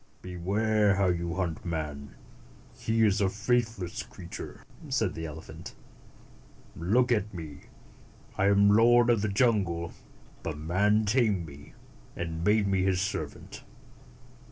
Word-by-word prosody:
"Beware 100 +3 +1
how 95 -1 +2
you 85 -1 -1
hunt 90 -4 -2
man. 75 -4 -5 0.6
He 110 0 +1
is 105 -1 +2
a 95 - +3
faith 115 +3 0
less 90 -2 -5
creature," - - -9 0.3
said 115 -8 0
the 80 0 -5
elephant. 80 +1 -10 1.0
"Look 120 +9 +2
at 105 -2 +1
me. 75 -4 -8 0.7
I 100 - +2
am 100 0 +5
lord 120 +2 +5
of 115 -3 +2
the 110 - 0
jungle, 100 -6 +1 0.5
but 80 -3 -4
man 100 +7 +2
tamed 105 -5 +2
me, 75 0 -13 0.4
and 80 -1 -4
made 105 +2 +3
me 95 -1 +1
his 95 -1 +1
servant. 100 +2 -5
95 Hz, 130 wpm, -28 LUFS, 85-110 Hz, 1.0 s, am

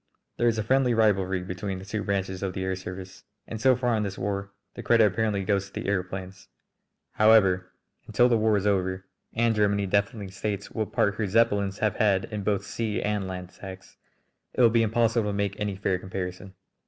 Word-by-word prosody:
There 120 - +2
is 115 -1 +2
a 110 - 0
friendly 130 +1 +2
rivalry 95 -4 +2
between 95 +1 -4
the 95 - -9
two 105 +1 -3
branches 95 -2 -2
of 95 -2 -2
the 95 - -3
air 95 0 -1
service, 95 0 -8 0.2
and 110 -1 -7
so 130 +1 +5
far 120 -1 0
in 110 - 0
this 100 -2 -4
war 100 0 -3 0.2
the - - -7
credit 115 -2 +4
apparently 105 0 0
goes 100 0 0
to - - -29
the - - -5
aëroplanes. 95 -1 -4 0.6
However, 95 -4 +4 0.4
until 120 - +4
the 120 - +3
war 110 -1 +3
is 100 - -2
over, 95 -2 0 0.3
and 115 0 +2
Germany 100 -1 +1
definitely 100 +1 -1
states 100 +1 -4
what 110 -2 -3
part 100 - +2
her 105 - -1
Zeppelins 100 -2 +2
have 110 - 0
had 100 -4 +2
in 105 - -2
both 100 0 -1
sea 110 -3 -2
and 105 -2 -1
land 90 -1 -6
attacks, 95 -1 -11 0.6
it - - +2
will 115 -2 +6
be 115 0 +3
impossible 115 0 +1
to - - -2
make 100 0 -2
any 105 -2 -2
fair 95 -1 -1
comparison. 95 0 -6
100 Hz, 205 wpm, -26 LUFS, 95-110 Hz, 0.6 s, will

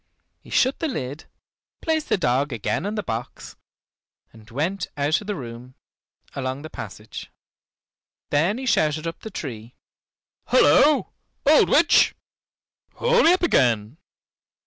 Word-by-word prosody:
He - - -18
shut 260 +1 +2
the 325 - -1
lid, 145 - -5 0.5
placed 320 -1 -1
the - - +3
dog 140 -3 0
again 120 - -2
on 210 - -3
the 210 - -2
box, 115 -5 -6 0.8
and 110 -1 -16
went 175 +9 -2
out 145 +5 +1
of 205 - -11
the 210 - -2
room, 125 -2 -9 0.6
along 130 +1 -4
the 155 - -9
passage. - - -9 1.0
Then 165 +9 +2
he 260 - -5
shouted 155 - +1
up 165 - -5
the 220 - -8
tree, 120 - -7 0.7
"Halloo, 305 - +5 0.4
old 300 +2 +5
witch! 330 +3 +4 0.8
haul 485 0 +3
me 335 - +6
up 365 - -1
again." 120 - +2
155 Hz, 135 wpm, -23 LUFS, -, 1.0 s, me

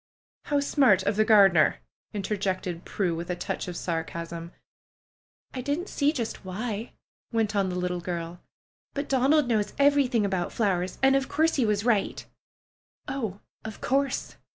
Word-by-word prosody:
"How 290 -1 +1
smart 265 - +4
of 205 - 0
the 215 - +4
gardener 195 -7 +6 0.2
!" - - -80
interjected 190 -4 -2
Prue, 185 -4 -1
with 170 +2 -5
a 180 - 0
touch 175 - -4
of 175 -1 -5
sarcasm. 170 0 -4 1.0
"I 255 - -4
didn't 290 +9 -2
see 285 0 +2
just 240 -8 -4
why," 215 +4 -4 0.4
went 220 -2 0
on 195 -2 +2
the 180 - -3
little 180 0 -1
girl; 170 0 -5 0.5
"but 285 +1 -2
Donald 275 +2 +3
knows 215 -3 0
everything 280 -6 +3
about 190 -3 -1
flowers, 185 -4 0
and 270 0 +6
of 270 -1 0
course 320 +2 +2
he 245 -5 +2
was 210 0 0
right." 220 -5 +1 0.8
"Oh, 225 -8 -4 0.2
of 220 -1 -7
course 275 0 -1
210 Hz, 155 wpm, -27 LUFS, 180-265 Hz, 1.0 s, gardener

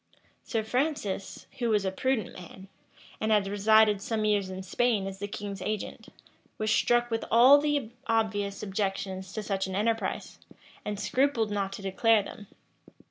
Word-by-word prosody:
Sir 225 -2 -2
Francis, 235 -5 -2
who 240 -2 0
was 210 -3 +2
a 190 - 0
prudent 245 0 -1
man, 185 +2 -12 0.5
and 220 - 0
had 210 -2 +4
resided 210 0 +4
some 215 0 -1
years 205 -2 +1
in 190 0 -6
Spain 215 +1 +1
as 195 0 -6
the 205 - -3
king's 200 -1 -6
agent, 215 +2 -4 0.5
was 215 0 0
struck 240 +1 +2
with 225 - -1
all 255 +5 +8
the 290 -6 -1 0.2
obvious 205 -3 0
objections 195 -2 -3
to 215 - -4
such 195 -2 -1
an 190 - -4
enterprise, 225 +3 -2 0.4
and 210 -1 -4
scrupled 250 -1 +1
not 200 -1 -1
to 200 - -8
declare 210 +3 +3
them. 205 +1 -10
210 Hz, 160 wpm, -28 LUFS, 195-225 Hz, 0.5 s, all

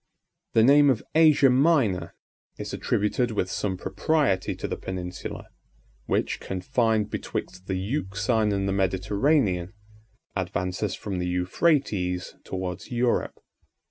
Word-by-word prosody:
The 110 - +5
name 145 +3 +6
of 125 -5 +1
Asia 155 -4 +6
Minor 125 - +2 0.4
is - - -6
attributed 105 +4 0
with 95 -4 -2
some 95 -3 -2
propriety 100 - 0
to - - -4
the - - -3
peninsula, 90 -1 -6 0.6
which, - - 0
confined 110 +2 0
betwixt 90 0 -5
the 95 - -1
Euxine 105 0 0
and 100 -1 0
the 95 - 0
Mediterranean, 95 - +1 0.6
advances 90 +3 -2
from 95 -3 -4
the 90 - -2
Euphrates 90 - 0
towards 90 -1 -5
Europe. 120 0 0
100 Hz, 115 wpm, -26 LUFS, 95-125 Hz, 0.6 s, name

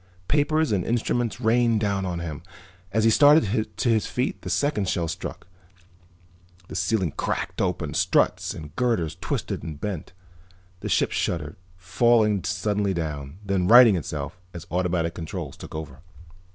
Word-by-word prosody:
Papers 155 0 +2
and 95 -4 +1
instruments 120 -1 -1
rained 115 -1 +3
down 100 -2 -1
on 85 -1 -3
him. 80 -4 -5 0.5
As 110 0 +1
he 115 - +5
started 125 -6 +4
to 125 - +1
his 110 -2 +2
feet 125 +2 -2
the - - -6
second 105 -10 0
shell 85 -2 0
struck. 80 - -6 1.2
The - - -7
ceiling 90 -1 0
cracked - - -2
open, - - -1
struts - - +1
and 75 0 -10
girders 110 -11 0
twisted - - -3
and 75 -3 -7
bent. 95 -3 -5 0.7
The - - -5
ship - - +2
shuddered, - - -2 0.2
falling 105 +2 +2
suddenly 100 +1 0
down, 75 -2 -4
then 95 -2 0
righting 120 -2 +8
itself 75 0 -5 0.2
as 85 0 -7
automatic 85 -2 0
controls 80 -2 -6
took - - -10
over. 75 -3 -7
100 Hz, 150 wpm, -25 LUFS, 85-115 Hz, 1.2 s, righting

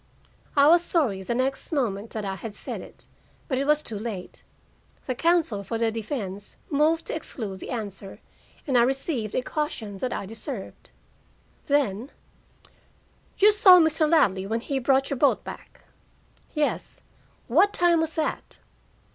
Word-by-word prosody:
I 280 +1 +7
was 340 +2 +6
sorry 260 - 0
the 235 +5 -3
next 265 +5 -2
moment 225 -8 -1
that 215 -2 -5
I 195 - -2
had 210 +2 -7
said - - -6
it, - - -14 0.4
but 260 -2 -1
it 275 - -1
was 300 0 +3
too 215 -3 -5
late. 210 -5 -6 0.6
The 255 - -1
counsel 320 -8 +1
for 230 +3 -3
the 225 0 +1
defense 210 -3 -5
moved 310 +3 +2
to - - -4
exclude 215 -11 -5
the - - -8
answer 205 -5 -6 0.5
and 260 -4 +3
I - - +6
received 260 - -1
a 255 - 0
caution 230 -10 -4
that 255 +2 -2
I - - -3
deserved. 225 +1 -7 0.8
Then: 265 -4 +1 1.3
"You 420 +2 +7
saw 390 -4 +8
Mr. 320 -1 +3
Ladley 195 - +3
when 225 +2 -1
he 270 +2 -2
brought 270 +2 +2
your 280 - -1
boat 285 - +3
back?" - - -11 0.7
"Yes." 300 -1 -2 0.4
"What 355 - +4
time 345 -4 +3
was 320 -1 -2
that?" 315 - -3
260 Hz, 155 wpm, -25 LUFS, 215-305 Hz, 1.3 s, saw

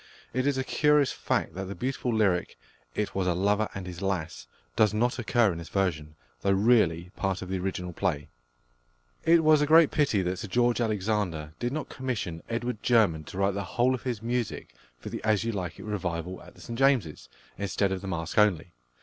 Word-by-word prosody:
It 130 +3 0
is 140 -2 +1
a 130 - 0
curious 150 0 +3
fact - - -1
that 95 +1 -5
the 100 +1 -6
beautiful 125 -1 -2
lyric, 100 -6 +1 0.4
"It 105 - -2
was 95 -1 -1
a 90 - +2
lover 100 +3 +1
and 95 -1 -5
his 90 0 -7
lass," 80 -11 -3 0.3
does 105 -1 +3
not 120 +2 +1
occur 120 -2 +3
in 85 - -5
this 85 - -9
version, 75 -6 -1 0.3
though 100 - +2
really 95 -5 +3
part 95 -1 -2
of 90 - -8
the 95 0 -1
original 90 -1 -3
play. 75 -2 -1 1.0
It 165 0 +5
was 155 -1 +5
a 150 - +2
great 160 0 +6
pity 140 -10 +2
that 90 +1 -2
Sir - - -5
George 120 +4 +2
Alexander 100 -8 -1
did 120 0 -1
not 150 0 -4
commission 110 -11 -4
+Edward 120 -1 -3
German+ 100 -11 +3
to 90 - -9
write 100 0 +2
the 100 +1 -3
whole 125 +2 +4
of 130 - -3
his 120 -4 -4
music 120 - -3 0.2
for - - -8
the - - -6
As 110 -2 +2
You 115 - -1
Like 90 -5 -4
It - - -9
revival 90 -3 -3
at - - -15
the - - -15
St 120 0 -6
James's, 115 - +1 0.3
instead 100 0 0
of 95 -1 -2
the 100 - -7
Masque 85 +1 -1
only. 90 -5 +2
100 Hz, 210 wpm, -28 LUFS, 90-120 Hz, 1.0 s, great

